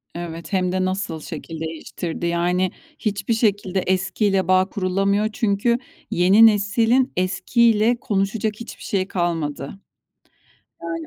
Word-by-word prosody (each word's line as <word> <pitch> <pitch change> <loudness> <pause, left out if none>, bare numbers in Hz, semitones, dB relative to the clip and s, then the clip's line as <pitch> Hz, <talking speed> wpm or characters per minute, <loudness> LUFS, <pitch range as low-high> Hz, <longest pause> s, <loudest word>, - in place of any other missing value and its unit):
Evet, 170 +2 -7
hem 185 -1 +1
de 185 0 0
nasıl 185 -3 -3
şekil 160 +1 -7
değiştirdi. 160 +1 -5
Yani, 175 +2 +1 0.3
hiçbir 205 0 -1
şekilde 205 -4 +1
eskiyle 190 +1 0
bağ 185 +1 +3
kurulamıyor. 195 +1 0
Çünkü 220 +2 +1 0.3
yeni 190 +6 +6
neslin 225 +4 +3
eskiyle 220 +5 +2
konuşacak 210 +1 -1
hiçbir 230 - -9
şeyi 190 -2 -1
kalmadı. 165 -7 -2 1.2
Yani, 330 -1 -4
195 Hz, 115 wpm, -22 LUFS, 180-215 Hz, 1.2 s, yeni